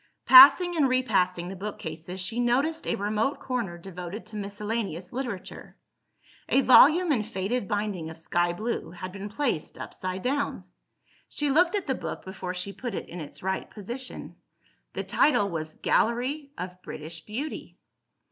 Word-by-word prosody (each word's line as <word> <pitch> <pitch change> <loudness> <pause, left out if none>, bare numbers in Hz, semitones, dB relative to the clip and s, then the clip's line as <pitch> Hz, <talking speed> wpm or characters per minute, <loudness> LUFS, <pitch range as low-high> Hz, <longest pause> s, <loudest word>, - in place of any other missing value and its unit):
Passing 285 +7 +9
and 290 -5 +3
repassing 190 -9 +1
the 190 - -6
bookcases, 180 -3 -6
she 190 +6 -3
noticed 275 +7 +1
a - - +1
remote 215 +7 -1
corner 235 -9 -3
devoted 180 +3 -8
to 215 - -11
miscellaneous 205 -3 -4
literature. 240 -7 -6 0.7
A 270 - +4
volume 310 +7 +7
in 250 -7 +2
faded 205 +1 -2
binding 205 -6 -2
of 160 - -9
sky 175 +1 0
blue, 220 +7 -3
had 180 +2 -7
been 200 +2 -7
placed 225 - -2
upside 185 0 -5
down. 280 +2 -1 0.7
She 295 -1 -1
looked 350 +6 +4
at 400 - -1
the 265 - 0
book - - -6
before 185 -1 -5
she 190 +2 -4
put 240 -3 -5
it - - -6
in 175 - -7
its 150 - -10
right 190 0 -2
position. 240 +5 -7 0.6
The - - -3
title 210 -9 +3
was 155 -1 -5
"Gallery 265 +5 0
of 180 0 -7
British 160 +1 -7
Beauty." 265 +9 -6
210 Hz, 155 wpm, -27 LUFS, 180-255 Hz, 0.7 s, Passing